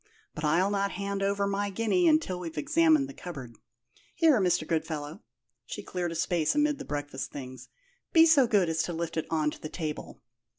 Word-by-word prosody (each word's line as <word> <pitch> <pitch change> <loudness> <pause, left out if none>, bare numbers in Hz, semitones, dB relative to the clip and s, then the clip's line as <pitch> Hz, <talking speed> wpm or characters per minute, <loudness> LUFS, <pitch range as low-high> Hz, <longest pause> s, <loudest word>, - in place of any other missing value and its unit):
But 150 - -7
I'll 170 +6 +2
not 200 -1 0
hand 200 +1 -3
over 200 0 +1
my 200 +1 -1
guinea 230 - +1
until 305 - +2
we've 165 -3 -7
examined 310 - +3
the 275 - -9
cupboard. 140 - -8 0.6
Here, 310 -9 +4
Mr. 180 -4 +2
Goodfellow" 160 0 -3 0.4
she - - -7
cleared 175 -2 -3
a - - -5
space 165 - +1
amid 295 -1 +2
the 275 - -7
breakfast 145 -2 -4
things 130 -2 -9 0.4
"be 325 -1 +7
so 295 -6 +5
good 205 -6 +3
as 165 0 0
to 175 - -3
lift 165 0 -4
it 160 - -2
on 155 -2 +1
to - - -12
the 155 - -6
table. 155 -3 -5
180 Hz, 195 wpm, -28 LUFS, 155-225 Hz, 0.6 s, be